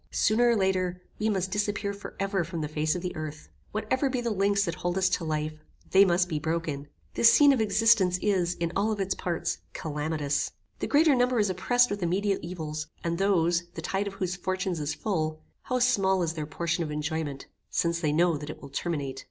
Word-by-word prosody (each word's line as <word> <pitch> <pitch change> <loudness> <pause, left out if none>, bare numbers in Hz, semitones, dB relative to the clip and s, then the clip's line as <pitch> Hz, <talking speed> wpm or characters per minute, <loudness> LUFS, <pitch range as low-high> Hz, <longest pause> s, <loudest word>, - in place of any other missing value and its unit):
Sooner 240 +3 +3
or 235 - +4
later, 185 -3 0 0.2
we 220 - +1
must 190 -2 -1
disappear 205 0 -1
for 200 - -9
ever 195 -2 0
from 165 0 -5
the 150 - -2
face 155 +1 0
of 180 - -4
the 180 - -4
earth. 155 -1 -7 0.2
Whatever 260 +6 0
be 255 -1 -1
the 235 -1 -1
links 200 0 +2
that 170 - -2
hold 175 +2 -2
us 190 -1 +3
to 180 - -1
life, 155 -1 -3 0.3
they 195 +1 +7
must 180 0 +2
be 155 -4 -2
broken. 160 -3 -2 0.3
This 230 - +6
scene 285 -1 +7
of 250 - +1
existence 215 -3 +4
is, 185 -4 +1
in 170 -1 -2
all 215 +3 +1
its 195 -2 -1
parts, 175 -2 -2
calamitous. 150 -1 -2 0.3
The - - -2
greater 300 +1 +5
number 250 -1 +2
is 205 -3 +2
oppressed 245 +6 +2
with 205 -1 -3
immediate 195 +3 +1
evils, 155 -3 -5 0.2
and 170 0 -1
those, 175 -3 +2
the 165 - -5
tide 195 +3 -1
of 195 - -6
whose 185 -2 -2
fortunes 185 -1 -2
is 150 0 -2
full, 155 -6 -2 0.2
how 255 - 0
small 195 -7 +3
is 165 -1 -1
their 155 -2 -4
portion 170 +2 -1
of 155 - -4
enjoyment, 150 -1 -3 0.2
since 170 0 0
they 155 -3 +1
know 170 +1 +3
that 150 +1 -7
it - - -7
will 140 - -10
terminate. 140 -2 -3
180 Hz, 210 wpm, -28 LUFS, 160-200 Hz, 0.3 s, they